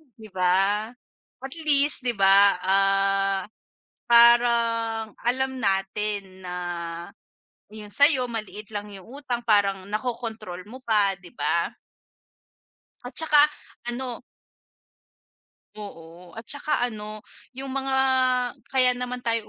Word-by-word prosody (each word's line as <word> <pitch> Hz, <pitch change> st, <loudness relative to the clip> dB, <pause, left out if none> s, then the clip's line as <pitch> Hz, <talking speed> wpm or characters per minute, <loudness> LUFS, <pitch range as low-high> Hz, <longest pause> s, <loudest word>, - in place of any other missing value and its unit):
'Di 220 Hz, -2 st, -13 dB
ba? 190 Hz, +3 st, +1 dB, 0.6 s
Atl 310 Hz, +4 st, -8 dB
east 285 Hz, -3 st, +3 dB
'di 240 Hz, -, +1 dB
ba, 195 Hz, -1 st, +5 dB
ah, 195 Hz, 0 st, +2 dB, 0.7 s
parang 235 Hz, -2 st, +4 dB, 0.2 s
alam 265 Hz, +1 st, -1 dB
natin 195 Hz, -1 st, -2 dB
na 180 Hz, -, -5 dB, 1.2 s
yung 210 Hz, -1 st, -6 dB
sayo 285 Hz, -3 st, +4 dB
maliit 215 Hz, -2 st, -7 dB
lang 205 Hz, 0 st, -5 dB
yung 195 Hz, -3 st, -11 dB, 0.2 s
utang 240 Hz, -3 st, -4 dB
parang 200 Hz, -3 st, +2 dB
nakokontrol 220 Hz, -4 st, -5 dB
mo 255 Hz, +5 st, -12 dB
pa 210 Hz, -4 st, +2 dB
'di 175 Hz, -, -13 dB
ba? -, -, 0 dB, 1.3 s
At 245 Hz, 0 st, -5 dB
saka 300 Hz, -2 st, +5 dB, 0.4 s
ano 245 Hz, -1 st, -5 dB, 1.6 s
Oo 175 Hz, -3 st, -11 dB
at 225 Hz, -, -8 dB
saka 285 Hz, 0 st, 0 dB
ano 215 Hz, -2 st, -6 dB, 0.3 s
yung 270 Hz, 0 st, -6 dB
mga 270 Hz, 0 st, -1 dB, 0.7 s
kaya 255 Hz, -1 st, +3 dB
naman 250 Hz, 0 st, -5 dB
tayo 230 Hz, -2 st, -1 dB
220 Hz, 110 wpm, -24 LUFS, 195-250 Hz, 1.6 s, ba